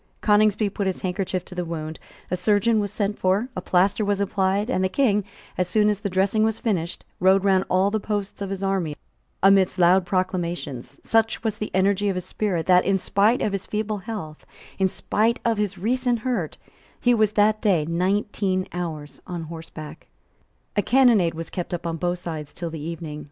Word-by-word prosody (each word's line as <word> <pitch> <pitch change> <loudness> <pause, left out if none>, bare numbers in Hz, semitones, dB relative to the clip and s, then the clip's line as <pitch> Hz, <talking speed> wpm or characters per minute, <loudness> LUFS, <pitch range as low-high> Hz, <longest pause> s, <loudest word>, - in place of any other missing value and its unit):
Coningsby 210 0 +3
put 200 0 -2
his 190 - -2
handkerchief 185 -1 -2
to - - -10
the 180 -1 -2
wound: 160 -2 -5 0.3
a - - +2
surgeon 210 +4 +2
was 205 -2 -2
sent 205 0 -2
for: 195 +7 +1
a 185 - -3
plaster 190 +4 +2
was 205 -1 0
applied; 200 +1 +1
and 215 -7 0
the 185 - +2
King, 210 -4 +2 0.4
as 180 - +2
soon 210 +3 +3
as 205 -2 0
the 205 - -2
dressing 195 +3 +2
was 220 0 +1
finished, 185 -8 -2
rode 190 +1 +4
round 190 -1 +3
all 190 +2 +3
the 220 - 0
posts 205 -1 -4
of 200 - -3
his 195 0 -4
army 190 -6 -1 0.5
amidst 195 -1 +5
loud 180 +1 +5
acclamations. 175 -8 -2
Such 225 0 +1
was 220 -1 -2
the 215 - -3
energy 200 +2 +2
of 195 - -1
his 180 - -4
spirit 185 -6 -2
that, 180 -1 +5
in 195 -1 +2
spite 205 +5 +2
of 210 - 0
his 195 -1 -4
feeble 215 0 -2
health, 190 -7 -7 0.4
in 190 -1 +3
spite 225 +5 0
of 230 -2 +1
his 205 -2 -1
recent 245 +5 0
hurt, 215 - -2 0.4
he 245 - +3
was 215 -2 +2
that 215 +1 +3
day 185 -9 +2
nineteen 185 +2 0
hours 160 -4 -5
on 175 -2 -4
horseback, 160 -1 -9 0.7
A 205 - +3
cannonade 225 -8 +4
was 165 0 -6
kept 180 -1 -3
up 175 - -8
on 165 -1 -2
both 175 +1 -1
sides 160 -4 -6
till 170 -2 -5
the 160 -2 -6
evening. 160 -1 -6
195 Hz, 195 wpm, -24 LUFS, 175-210 Hz, 0.7 s, amidst